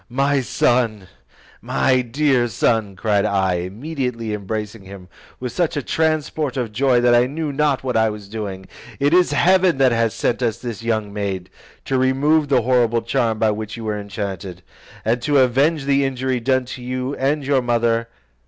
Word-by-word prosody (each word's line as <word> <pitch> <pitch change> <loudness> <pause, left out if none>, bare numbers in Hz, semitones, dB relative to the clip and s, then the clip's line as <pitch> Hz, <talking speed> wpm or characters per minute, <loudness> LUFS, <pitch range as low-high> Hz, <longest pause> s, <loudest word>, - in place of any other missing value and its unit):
"My 140 +2 +1
son, 115 -5 0 0.5
my 130 -1 +2
dear 125 0 +1
son," 110 -2 0
cried 100 0 +1
I, 95 -3 +1
immediately 115 - -4
embracing 105 +1 -5
him 95 -2 -11 0.3
with 125 -1 -4
such 170 -4 -1
a 145 - -2
transport 155 -2 -1
of 120 -4 -2
joy 125 +2 +2
that 120 0 +4
I 120 +1 +4
knew 150 +1 -4
not 145 -2 +1
what 130 -1 -2
I 110 0 +3
was 105 -2 -8
doing, 100 -3 -6 0.3
"it 145 +3 +2
is 180 0 +4
heaven 185 -3 +3
that 135 -2 +4
hath 115 -1 +1
sent 120 - -1
us 115 -3 0
this 115 -4 -6
young 110 -3 -2
maid, 100 -3 -4 0.3
to 135 -1 0
remove 145 +4 +2
the 130 -4 +2
horrible 120 -2 +2
charm 115 -2 0
by 110 0 +2
which 110 +1 -5
you 115 - -7
were 105 -1 -2
enchanted, 95 -3 -6 0.4
and 120 +2 +1
to 145 +2 +1
avenge 135 +4 +2
the 140 0 +2
injury 130 -1 -1
done 130 +2 +1
to 125 0 -8
you 130 +2 -3
and 140 +2 0
your 135 -1 +2
mother. 115 -1 +1
120 Hz, 180 wpm, -20 LUFS, 110-135 Hz, 0.5 s, that